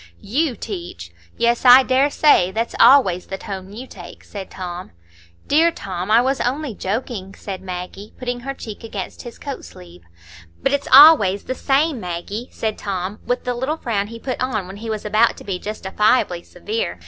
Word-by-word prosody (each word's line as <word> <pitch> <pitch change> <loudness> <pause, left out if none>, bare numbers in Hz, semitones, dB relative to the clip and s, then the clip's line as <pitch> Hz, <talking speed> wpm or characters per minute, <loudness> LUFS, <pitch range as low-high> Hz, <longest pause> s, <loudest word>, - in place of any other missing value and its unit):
"You 275 +4 0
teach! 175 - -7 0.3
Yes, 235 0 +1
I 255 +1 +9
dare 265 +2 +2
say. 285 - +4
That's 225 +4 -3
always 190 -11 +5
the 190 - -5
tone 190 -1 -7
you 235 +5 -8
take," - - -12
said 195 -2 -8
Tom. 180 -1 -7 0.6
"Dear 320 +3 +4
Tom, 185 - -6
I 225 +2 +6
was 265 +1 0
only 265 +1 -2
joking," 200 -1 -4
said 195 -2 -7
Maggie, 185 +2 -7
putting 245 -1 -4
her 275 +3 -6
cheek 220 -5 -9
against 205 -4 -6
his 240 - -10
coat 280 -2 -7
sleeve. 90 0 -14 0.6
"But 270 - +2
it's 285 - -1
always 210 -11 +8
the - - -3
same, 280 +1 +1
Maggie," 185 +6 -5
said 220 -1 -3
Tom, 195 +1 -4
with 245 +1 -1
the 250 - -1
little 265 +6 -2
frown 205 -8 -2
he 230 +2 -9
put 255 +2 -5
on 230 -7 -1
when 190 +2 -9
he 225 +2 -7
was 215 -1 -4
about 215 +2 +2
to - - -11
be 190 -3 -4
justifiably 210 -2 0
severe. 445 - -4
220 Hz, 185 wpm, -20 LUFS, 190-260 Hz, 0.6 s, I